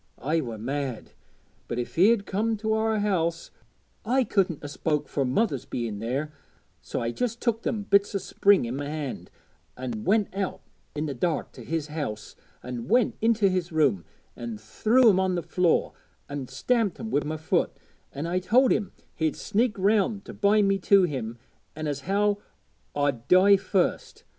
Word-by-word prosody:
I 155 +6 0
were 115 -5 -6
mad; 130 +1 -4 0.6
but 120 - -4
if 120 - -4
he'd 200 +4 +4
comed 220 +3 -1
to 220 0 +1
our 220 0 +1
house 170 -5 -1 0.5
I 255 +4 +2
couldn't 190 - 0
'a - - -4
spoke 150 +1 -1
fur 140 - -1
mother's 140 - 0
being 115 -4 -4
there; 135 +7 -3 0.5
so - - -4
I 115 0 -1
just 235 - -2
took 230 -2 0
them 220 -4 -2
bits 200 0 +2
o' - - +4
Spring 195 -4 +3
i' - - -4
my 140 +3 -4
hand, 150 -4 -5 0.5
an' 120 -4 -4
went 205 +1 +2
out 195 -2 -3 0.3
i' 150 - -2
the 150 -2 -2
dark 160 +6 -1
to - - -11
his 165 -2 -2
house, 125 -9 -5 0.3
an' 125 -2 -6
went 240 0 +3
into 225 -2 +3
his 185 -2 -1
room, 140 - +2 0.3
an' 115 -2 -6
threw 220 - +3
'em 190 -4 +5
on 190 -1 +1
the 175 - -2
floor, 180 -2 +1 0.3
an' 140 -2 -5
stamped 210 - 0
'em 225 -1 -5
wi' 145 - +2
my 155 +1 -3
foot, 155 - 0 0.4
an' 145 +3 -5
I 175 +2 0
told 245 +8 +4
him 205 -3 0
how - - -28 0.2
he'd 160 -2 0
sneaked 225 +1 0
round 205 +1 +1
to - - -8
bind 205 0 +3
me 195 0 +2
to 195 +1 +5
him, 125 -8 -3 0.4
an' 155 +1 -5
as 145 -2 -2
how 205 +1 +2 0.6
I'd 140 -5 -1
die 190 +2 +7
first. 190 -1 -1
175 Hz, 180 wpm, -26 LUFS, 140-205 Hz, 0.6 s, die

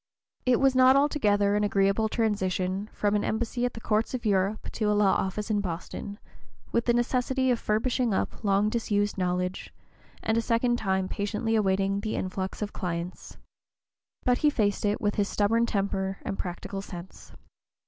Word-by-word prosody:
It 250 -2 +4
was 270 -1 +4
not 255 0 +6
altogether 210 -9 +3
an 210 - +1
agreeable 200 +2 +2
transition 195 -3 -1
from 205 0 0
an 205 - +1
embassy 235 +2 -1
at 245 - -2
the - - -6
courts 220 +3 0
of 245 - -6
Europe 200 0 0
to 220 - -2
a - - +3
law 205 -2 +4
office 205 +3 -2
in 205 -1 +2
Boston, 185 +2 -5 0.5
with 235 - +1
the 240 - +3
necessity 255 +2 +1
of 240 - +1
furbishing 235 +3 0
up 190 - -2
long 200 0 +3
disused 205 -2 0
knowledge, 180 0 -2 0.5
and 220 +1 +2
a - - +1
second 240 +1 +1
time 190 -3 0
patiently 210 +3 -2
awaiting 195 -2 +1
the 215 +1 -3
influx 190 +2 -3
of 205 - -5
clients. 175 -1 -5 0.9
But 250 -1 +2
he 300 - +4
faced 210 -7 0
it 205 +1 +1
with 205 -1 -1
his 205 -1 +1
stubborn 230 +3 +2
temper 195 -2 -1
and - - -3
practical 195 +2 -5
sense. 180 -2 -10
210 Hz, 170 wpm, -27 LUFS, 195-230 Hz, 0.9 s, not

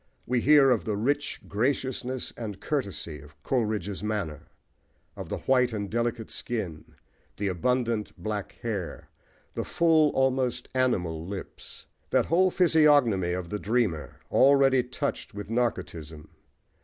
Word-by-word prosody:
We 125 -1 +1
hear 140 -1 +6
of 120 - +2
the 105 -2 -2
"rich 145 +7 -1
graciousness 130 +2 -2
and 105 -5 -6
courtesy" 100 - -3
of 75 +1 -17
Coleridge's 105 -6 -1
manner, 105 -8 -3 0.7
of - - -7
the - - -2
white 125 -2 +2
and 100 -2 -4
delicate 115 -1 -2
skin, 95 -10 -4 0.4
the 100 -1 -1
abundant 115 +3 0
black 105 -2 -4
hair, 100 -7 -4 0.4
the - - -2
full, 160 -3 +3
almost 130 -2 0
animal 90 -11 0
lips 100 0 -8 0.2
that - - +3
whole 185 +3 +3
physiognomy 145 - +4
of 90 -1 -4
the 105 - -3
dreamer, 105 -9 -1 0.2
already 135 -1 +5
touched 125 -4 -4
with 105 +1 -6
narcotism. 80 -10 -3
115 Hz, 130 wpm, -27 LUFS, 100-130 Hz, 0.7 s, hear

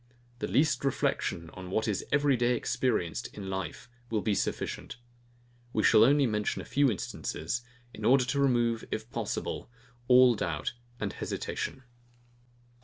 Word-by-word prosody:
The - - -2
least 145 +1 +2
reflection 135 - -1
on 95 -1 -8
what 110 +4 0
is 105 -4 -1
every 140 -1 +4
day 120 0 +2
experienced 120 -8 -1
in 95 -2 -5
life, 95 -4 -4 0.2
will 110 -2 0
be 105 - +2
sufficient. 100 - -3 0.8
We 110 - +1
shall 110 - +7
only 140 +3 +5
mention 105 -3 -1
a - - -6
few 140 -1 +3
instances, 100 0 -3 0.3
in - - -9
order 130 0 +5
to 140 +3 -1
remove, 120 -4 +2
if 110 +2 -4
possible, - - -3 0.4
all 125 -1 +7
doubt 80 -6 -2 0.3
and - - -2
hesitation. 130 - -4
120 Hz, 145 wpm, -30 LUFS, 105-130 Hz, 0.8 s, shall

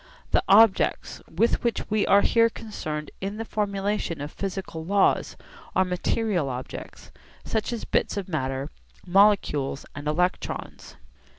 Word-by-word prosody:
The - - +4
objects 210 0 +4
with 215 +9 +1
which 235 -1 -1
we 215 -1 +2
are 200 - +6
here 230 +2 +4
concerned 155 -10 -6
in 200 +2 -4
the 225 - -4
formulation 200 -5 -2
of 145 +2 -5
physical 190 -4 -5
laws 195 +3 +2 0.4
are 190 - +4
material 180 -2 0
objects, 125 0 -8 0.3
such 220 +2 -1
as 235 -2 -4
bits - - 0
of 200 - -3
matter, 135 -3 -3 0.3
molecules 180 -8 +3
and 145 +1 -7
electrons. 180 +4 -2
195 Hz, 130 wpm, -25 LUFS, 155-210 Hz, 0.4 s, are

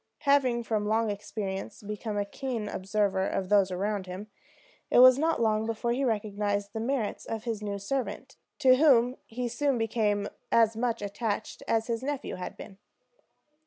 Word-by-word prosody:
Having 265 -5 +3
from 215 -2 -1
long 220 0 +1
experience 205 -1 -5
become 210 +1 -4
a 205 - 0
keen 235 0 -4
observer 195 -1 0
of 185 -1 -2
those 200 -2 +4
around 195 +1 -2
him, 195 +4 -7 0.6
it - - +3
was 255 +1 +8
not 325 +1 +1
long 220 -1 +1
before 230 +1 -1
he 260 +3 0
recognized 205 -3 -1
the 220 - -3
merits 235 -2 -2
of 220 -1 -5
his 225 -3 -3
new 205 -1 -3
servant, 260 +4 -4 0.2
to 260 -3 +5
whom 255 -4 +5
he 245 +2 -3
soon 265 +3 0
became 210 -3 0 0.2
as 225 -1 +4
much 230 -2 -1
attached 205 +1 -3
as 225 -1 +1
his 230 0 -2
nephew 285 0 -3
had 180 - -6
been. 195 -1 -11
220 Hz, 165 wpm, -28 LUFS, 205-245 Hz, 0.6 s, was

